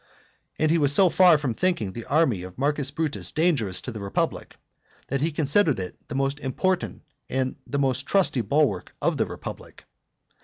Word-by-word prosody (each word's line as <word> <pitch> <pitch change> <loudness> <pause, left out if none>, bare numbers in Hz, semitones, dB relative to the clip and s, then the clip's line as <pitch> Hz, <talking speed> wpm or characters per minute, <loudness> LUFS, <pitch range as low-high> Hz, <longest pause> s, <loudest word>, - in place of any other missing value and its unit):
And 155 0 +2
he 165 - +3
was 145 -2 +3
so 185 +5 +5
far 180 -2 +6
from 140 -5 -2
thinking 115 - -1
the 115 - -7
army 140 - +2
of 90 0 -10
Marcus 140 0 0
Brutus 150 +1 -3
dangerous 145 - +1
to 125 - -6
the 110 - -7
republic, 100 -1 -2 0.5
that 135 0 -1
he 160 +3 +1
considered 150 +1 +2
it 90 -1 -5
the - - -6
most 135 +1 0
important 180 +7 -1 0.3
and 130 0 -1
the 140 - -2
most 135 -1 0
trusty 190 -10 +2
bulwark 115 -4 0
of - - 0
the - - +1
republic. - - -9
140 Hz, 180 wpm, -25 LUFS, 125-160 Hz, 0.5 s, far